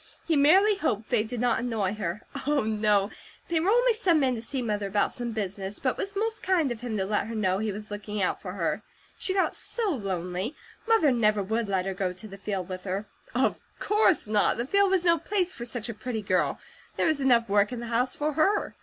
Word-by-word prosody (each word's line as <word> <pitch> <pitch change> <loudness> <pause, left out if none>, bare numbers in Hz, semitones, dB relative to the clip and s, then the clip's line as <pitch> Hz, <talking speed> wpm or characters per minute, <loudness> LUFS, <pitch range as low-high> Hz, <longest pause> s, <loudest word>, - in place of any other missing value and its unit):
He 330 - +2
merely 380 +9 +5
hoped 225 - -2
they - - +4
did 230 +2 -4
not 245 0 +2
annoy 220 -5 -1
her. 200 -1 -4 0.2
Oh, 290 -3 +2
no, 210 -2 +2 0.4
they 335 -1 +2
were 345 +5 +1
only 485 +2 +4
some 370 -8 +3
men 265 -3 +2
to 230 - -4
see 265 +3 -4
Mother 210 -4 -1
about 200 +1 +1
some 240 -1 -4
business, 200 -2 -4
but 255 - +1
it - - -10
was 395 +1 -4
most 445 +2 -1
kind 345 -8 +2
of 235 -1 -5
him 235 -3 -3
to 190 - 0
let 210 +1 0
her 230 - -5
know 190 -3 +1
he 215 0 -1
was 210 +1 -8
looking 205 0 -5
out 185 - 0
for - - -6
her. - - -1 0.4
She 375 - -1
got 380 - +2
so 450 -5 -2
lonely; 190 - -3 0.3
Mother 445 -11 +4
never 215 -4 +2
would 220 +3 -1
let 190 -2 0
her 195 - -2
go 185 -1 -2
to 185 +4 -9
the 195 -1 -11
field 190 -2 -3
with 185 -1 -6
her. 195 +2 -2 0.3
Of - - +1 0.2
course 420 -4 +3
not! 210 0 +3
The 235 - -1
field 400 +7 +3
was 370 -2 +1
no 335 -1 +5
place 380 -3 -1
for 235 - -7
such 240 -1 -3
a 235 - -4
pretty 225 -1 -4
girl; 185 -2 +1 0.4
there - - +2
was 315 -3 +1
enough 240 -3 +4
work 205 +1 +3
in 245 - -4
the 235 - -5
house 240 +2 0
for 300 +1 -1
her. 385 +8 +1
230 Hz, 240 wpm, -27 LUFS, 205-315 Hz, 0.4 s, merely